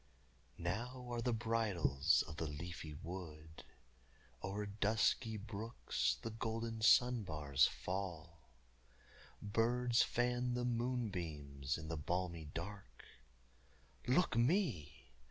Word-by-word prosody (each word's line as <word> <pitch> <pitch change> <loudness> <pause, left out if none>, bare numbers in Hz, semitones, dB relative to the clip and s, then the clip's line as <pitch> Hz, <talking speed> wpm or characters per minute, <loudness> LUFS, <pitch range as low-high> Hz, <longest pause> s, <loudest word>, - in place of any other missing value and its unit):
Now 120 +8 -3
are 120 -1 -1
the 125 - +1
bridals 105 - +2
of 75 -1 -8
the 80 - -1
leafy 75 +1 -6
wood, 80 -3 -7 0.8
O'er 100 +3 -3
dusky 110 +2 +1
brooks 105 - -1
the 115 - -3
golden 115 0 -3
sunbars 85 - +4
fall, 85 -5 -5 0.9
Birds 120 +3 +3
fan 125 0 +1
the 125 0 0
moonbeams 90 - -2
in 80 0 -7
the 80 0 -3
balmy 85 +1 -2
dark 80 -4 -7 1.0
Look 140 +5 +3
me! 115 - +1
100 Hz, 100 wpm, -38 LUFS, 80-115 Hz, 1.0 s, sunbars